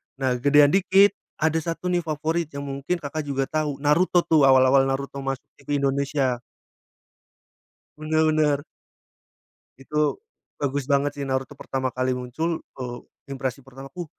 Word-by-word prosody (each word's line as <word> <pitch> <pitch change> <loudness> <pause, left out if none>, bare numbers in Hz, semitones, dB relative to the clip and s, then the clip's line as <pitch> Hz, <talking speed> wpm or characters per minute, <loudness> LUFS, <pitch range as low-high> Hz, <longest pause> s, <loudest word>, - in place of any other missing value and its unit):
Nah 130 -2 -1
gedean 145 +2 +5
dikit, 195 +2 +5 0.2
ada 160 +1 +1
satu 165 +2 -3
nih 175 - +2
favorit 160 +2 -1
yang 140 - -4
mungkin, 140 +5 -3
Kakak, 155 -1 -5
juga 135 -1 0
tahu 150 -2 -2
Naruto 170 +4 +3
tuh 150 -4 +4
awal-awal 130 0 +5
Naruto 140 +1 -3
masuk 135 -1 -3 0.2
TV 145 +1 -3
Indonesia. 135 -2 0 1.6
Bener 155 +1 +1
bener. 150 -2 +2 1.2
Itu 150 - -1 0.4
bagus 140 -1 -1
banget 140 +1 +3
sih 140 - -3
Naruto 135 +2 -2
pertama 130 -1 -2
kali 130 +1 -1
muncul, 140 +7 -3 0.2
eee, 120 -2 -5 0.3
impresi 135 0 -3
pertama 135 +1 -11
ku, 180 -1 -5
140 Hz, 140 wpm, -24 LUFS, 135-155 Hz, 1.6 s, gedean